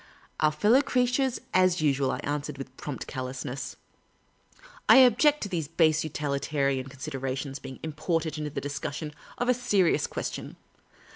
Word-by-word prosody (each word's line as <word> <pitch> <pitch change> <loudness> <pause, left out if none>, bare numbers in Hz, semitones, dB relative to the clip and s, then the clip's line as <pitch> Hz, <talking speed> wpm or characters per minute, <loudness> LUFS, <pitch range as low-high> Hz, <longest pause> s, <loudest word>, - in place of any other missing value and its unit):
" - - -24
Our 155 -1 +4
fellow 210 - +4
creatures, 255 -1 +1
as 185 -1 +4
usual," 140 -3 +2
I - - -1
answered, 145 0 -3
with 135 -1 -8
prompt 145 -1 -6
callousness. 130 0 -5 0.5
" - - -23
I - - +10
object 265 +4 +6
to - - -2
these 165 -5 -2
base 160 -1 +3
utilitarian 140 -3 -1
considera 135 -1 -4
tions 135 0 -5
being 135 -1 -9
imported 160 0 -1
into 150 -1 -3
the 145 - -4
discussion 145 +2 -4 0.2
of 245 - -1
a 250 - +5
serious 205 -8 +2
ques - - -3
tion. - - -7
150 Hz, 160 wpm, -28 LUFS, 140-190 Hz, 0.5 s, I